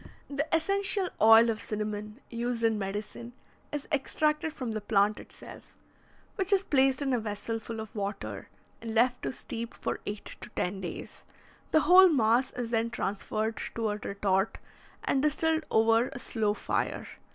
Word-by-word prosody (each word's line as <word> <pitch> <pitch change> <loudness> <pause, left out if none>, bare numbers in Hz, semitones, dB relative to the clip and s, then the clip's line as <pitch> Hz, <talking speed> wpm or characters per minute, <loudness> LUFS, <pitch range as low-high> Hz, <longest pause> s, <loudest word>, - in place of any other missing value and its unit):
The 285 +2 -1
essential 390 +3 +1
oil 225 +1 +8
of 220 - -4
cinnamon, 210 +2 -4
used 235 0 -2
in 225 -2 +2
medicine, 210 +4 -5 0.4
is 295 -1 -4
extracted 300 +2 0
from 255 -6 -5
the 215 -1 -3
plant 205 0 +2
itself, - - -13 0.6
which 385 +1 0
is 390 -1 +4
placed 270 -3 +3
in 270 -2 0
a 245 - +2
vessel 220 +1 -4
full 225 0 -7
of 220 +1 -8
water, 200 -1 -4 0.3
and 225 -1 -5
left 245 +2 +3
to - - -2
steep 235 -2 -6
for - - -3
eight 205 0 -5 0.2
to - - -8
ten 190 +2 -2
days. 175 - -7 0.5
The 315 - +4
whole 370 +2 +8
mass 245 -2 +3
is 240 -2 -4
then 230 0 +1
transferred 215 +1 -2 0.2
to 225 -1 0
a 210 - -2
retort 200 0 0 0.5
and 270 - +1
distilled 315 +2 +1
over 225 +2 +4
a 275 - -7
slow 220 -3 -1
fire. - - -2
230 Hz, 165 wpm, -29 LUFS, 215-275 Hz, 0.6 s, oil